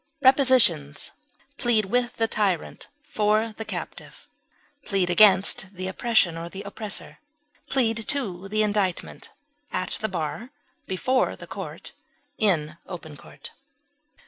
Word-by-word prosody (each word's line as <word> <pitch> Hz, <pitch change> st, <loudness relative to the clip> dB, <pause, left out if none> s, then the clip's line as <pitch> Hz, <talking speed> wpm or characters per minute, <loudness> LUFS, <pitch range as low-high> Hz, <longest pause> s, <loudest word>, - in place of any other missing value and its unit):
Prepositions: 255 Hz, -, +4 dB, 0.5 s
Plead 230 Hz, -4 st, +2 dB
with 245 Hz, +4 st, 0 dB
the 225 Hz, -2 st, 0 dB
tyrant 200 Hz, -6 st, -1 dB, 0.2 s
for 215 Hz, 0 st, +1 dB
the 220 Hz, -, -4 dB
captive; -, -, -8 dB, 0.6 s
plead 190 Hz, -6 st, 0 dB
against 190 Hz, 0 st, +5 dB
the 185 Hz, +1 st, -4 dB
oppression 190 Hz, -4 st, +2 dB
or 170 Hz, +1 st, -6 dB
the 195 Hz, +3 st, -8 dB
oppressor; 205 Hz, 0 st, -5 dB, 0.5 s
plead 230 Hz, -4 st, +1 dB
to 195 Hz, -11 st, -1 dB
the 215 Hz, +2 st, +1 dB
indictment; 205 Hz, -4 st, -2 dB, 0.4 s
at -, -, -2 dB
the 220 Hz, -, -1 dB
bar; 185 Hz, +7 st, -4 dB, 0.4 s
before 255 Hz, +8 st, 0 dB
the -, -, -11 dB
court; -, -, -8 dB, 0.5 s
in 160 Hz, -7 st, +1 dB
open 160 Hz, -5 st, -8 dB
court. -, -, -12 dB
210 Hz, 120 wpm, -25 LUFS, 185-230 Hz, 0.6 s, against